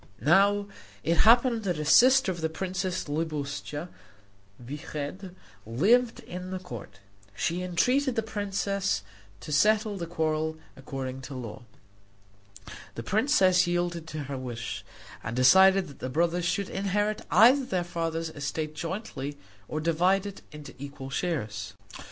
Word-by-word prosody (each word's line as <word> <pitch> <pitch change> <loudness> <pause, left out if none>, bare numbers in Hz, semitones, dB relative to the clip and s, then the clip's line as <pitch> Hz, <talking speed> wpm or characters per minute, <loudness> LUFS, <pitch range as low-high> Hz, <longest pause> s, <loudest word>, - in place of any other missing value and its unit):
Now 200 +5 +4 0.4
it 165 +1 +1
happened 235 -1 +5
that 180 -6 -1
a 150 - -3
sister 255 - +6
of 175 -2 -6
the 160 - 0
princess 185 +1 -3
Libuscha 150 0 -3 0.7
Vyched 150 +7 -6 0.3
lived 220 - +2
at 180 +1 -7
the 190 - -3
court. 180 - -9 0.4
She 170 - -1
entreated 245 +10 +1
the 225 - 0
princess 200 - -1 0.4
to 155 - -8
settle 210 +6 +3
the 170 -2 -4
quarrel 160 -1 -1 0.2
according 135 -1 -6
to 140 - -7
law. 115 -5 -7 1.3
The 115 - -5
princess 185 - +3
yielded 175 -1 -1
to 155 -2 -5
her 135 -1 -5
wish, 120 -2 -5 0.4
and 110 +2 -4
decided 190 +9 +6
that 140 - -13
the 130 - -4
brothers 170 +4 +1
should 185 +2 -1
either - - -3
inherit 205 +2 0
their 240 -6 +5
father's 165 -1 -3
estate 155 +1 -4
jointly 160 -4 -5 0.3
or 155 - -3
divide 175 +5 +2
it 200 -1 -7
into 150 -1 -10
equal 140 -1 -8
shares. 110 - -3
170 Hz, 135 wpm, -28 LUFS, 145-195 Hz, 1.3 s, sister